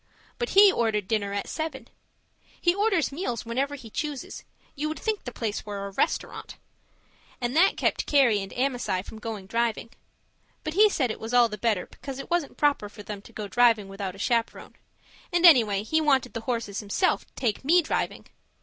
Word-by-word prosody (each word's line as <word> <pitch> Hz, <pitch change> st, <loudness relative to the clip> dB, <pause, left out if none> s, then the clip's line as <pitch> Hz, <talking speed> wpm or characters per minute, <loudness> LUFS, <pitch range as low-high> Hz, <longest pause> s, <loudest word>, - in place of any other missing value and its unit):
But 475 Hz, -, -1 dB
he 400 Hz, -1 st, +9 dB
ordered 220 Hz, -, 0 dB
dinner 205 Hz, -2 st, -1 dB
at 200 Hz, 0 st, -3 dB
seven 315 Hz, -4 st, -5 dB, 0.7 s
he 345 Hz, -, +3 dB
orders 395 Hz, -6 st, +1 dB
meals 275 Hz, -, -3 dB
whenever 270 Hz, +5 st, -1 dB
he 235 Hz, -6 st, -11 dB
chooses; 295 Hz, 0 st, -5 dB, 0.3 s
you 295 Hz, +2 st, -3 dB
would 310 Hz, -, -4 dB
think 435 Hz, -2 st, -3 dB
the 245 Hz, -, -4 dB
place 220 Hz, -4 st, -3 dB
were 200 Hz, -2 st, -5 dB
a 200 Hz, -, -6 dB
restaurant 195 Hz, -, -2 dB, 0.8 s
and 245 Hz, +2 st, -2 dB
that 360 Hz, +5 st, +4 dB
kept -, -, 0 dB
Carrie 250 Hz, -8 st, +4 dB
and 195 Hz, -, -7 dB
Amasai 245 Hz, -8 st, -1 dB
from 220 Hz, -, -10 dB
going 215 Hz, -3 st, -6 dB
driving. 230 Hz, +2 st, -1 dB, 0.7 s
But 310 Hz, -, -3 dB
he 420 Hz, +4 st, +6 dB
said 260 Hz, -, 0 dB
it -, -, -7 dB
was 225 Hz, +2 st, -3 dB
all 240 Hz, -1 st, +6 dB
the 210 Hz, -, -5 dB
better 215 Hz, -5 st, +1 dB
because 275 Hz, -2 st, -9 dB
it 275 Hz, -, -8 dB
wasn't 345 Hz, -5 st, -1 dB
proper 285 Hz, -8 st, +1 dB
for 210 Hz, 0 st, -12 dB
them 205 Hz, -1 st, -7 dB
to 215 Hz, -, -16 dB
go 215 Hz, -2 st, -6 dB
driving 225 Hz, -1 st, +3 dB
without 195 Hz, -1 st, -5 dB
a -, -, -12 dB
chaperon; 230 Hz, +3 st, -1 dB, 0.6 s
and 350 Hz, 0 st, +3 dB
anyway, 220 Hz, -, +6 dB
he 315 Hz, +8 st, +1 dB
wanted 270 Hz, -5 st, +2 dB
the 230 Hz, -, -4 dB
horses 230 Hz, -4 st, -3 dB
himself 215 Hz, -, 0 dB
to -, -, -33 dB
take 230 Hz, -3 st, -1 dB
me 340 Hz, +5 st, +4 dB
driving. -, -, -2 dB
240 Hz, 195 wpm, -26 LUFS, 210-300 Hz, 0.8 s, he